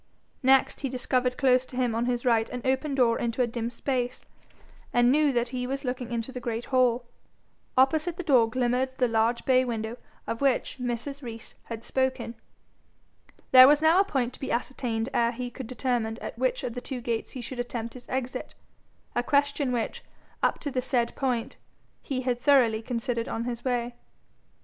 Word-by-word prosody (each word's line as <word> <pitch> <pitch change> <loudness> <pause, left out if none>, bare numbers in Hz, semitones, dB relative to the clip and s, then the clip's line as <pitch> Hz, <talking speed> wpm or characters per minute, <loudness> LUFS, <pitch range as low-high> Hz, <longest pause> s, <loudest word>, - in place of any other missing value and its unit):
Next 265 0 +4
he 275 - -1
discovered 250 0 0
close 255 -2 +4
to - - -11
him 250 -2 +1
on 230 +2 0
his 245 0 -1
right 230 -2 +3
an 250 -1 -6
open 265 +2 0
door 240 -3 +3
into 235 +1 0
a - - +3
dim 235 0 -3
space, 250 0 -2 0.7
and 240 0 +4
knew 300 0 +4
that 240 -1 0
he 250 0 -3
was 275 +2 -3
looking 250 -1 -3
into 235 +2 -3
the 255 - -5
great 235 -1 -3
hall. 250 -1 +3 0.7
Opposite 310 +6 +3
the 360 - -4
door 255 -8 +4
glimmered 255 +2 0
the 250 - +3
large 225 +1 +1
bay 255 -1 +4
window 230 -1 -3 0.3
of 230 - -4
which 270 -1 +1
Mrs. 250 +3 -4
Rees 230 -3 -8
had 230 -1 -7
spoken. 260 -3 -1 1.2
There 255 0 +10
was 295 +1 +6
now 325 +4 +6
a - - +6
point 260 -10 -1
to - - -13
be 270 - -4
ascertained 235 -2 -1
ere 235 -1 +2
he 245 +1 -5
could 260 -1 -7
determine 240 -3 -1
at - - -7
which - - 0
of 235 - -3
the 245 - -5
two 260 -1 -5
gates 230 -2 -3
he 255 - -5
should 245 +1 -6
attempt 235 -1 -4
his 250 -1 -12
exit 255 -1 -4 0.6
a - - +1
question 285 0 +1
which, 240 -2 -2 0.4
up - - +2
to 285 - -3
the 255 - 0
said 245 -2 0
point, 250 -4 -2 0.4
he 260 -2 -3
had 245 -1 -1
thoroughly 245 -6 +4
considered 235 0 -2
on 225 - -3
his 240 -1 -4
way. 245 -2 -1
250 Hz, 190 wpm, -27 LUFS, 235-265 Hz, 1.2 s, There